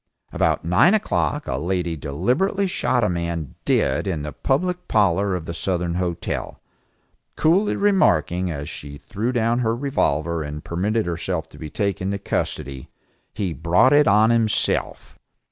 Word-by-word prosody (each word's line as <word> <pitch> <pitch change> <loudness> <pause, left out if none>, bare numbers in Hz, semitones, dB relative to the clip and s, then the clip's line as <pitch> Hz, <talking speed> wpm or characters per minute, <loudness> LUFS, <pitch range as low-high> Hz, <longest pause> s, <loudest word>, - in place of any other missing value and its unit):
About - - +1
nine 95 - +5
o'clock 155 -7 -1
a 65 - -1
lady 85 0 -1
deliberately 120 - 0
shot 130 -9 0
a - - +3
man 85 -4 -3
dead - - +1
in 80 -6 -2
the 75 - -5
public 180 +6 -1
parlor 100 -2 +2
of 85 -3 -5
the 85 - -5
Southern 90 -1 -1
Hotel, 90 -1 -3 0.8
coolly 185 +7 +2
remarking, 90 - +2
as 75 -3 -5
she 70 0 -8
threw 110 - -3
down 120 -1 +1
her 115 -2 +1
revolver 85 - 0
and 75 0 -6
permitted 105 +6 -1
herself 85 0 -3
to - - -15
be 80 - -6
taken 100 0 -2
into 100 +1 -1
custody, 70 -8 -4 0.5
"He 95 -5 -2
brought 85 - +3
it 145 0 +5
on 105 +3 +5
himself." 115 -2 0
95 Hz, 150 wpm, -22 LUFS, 85-120 Hz, 0.8 s, nine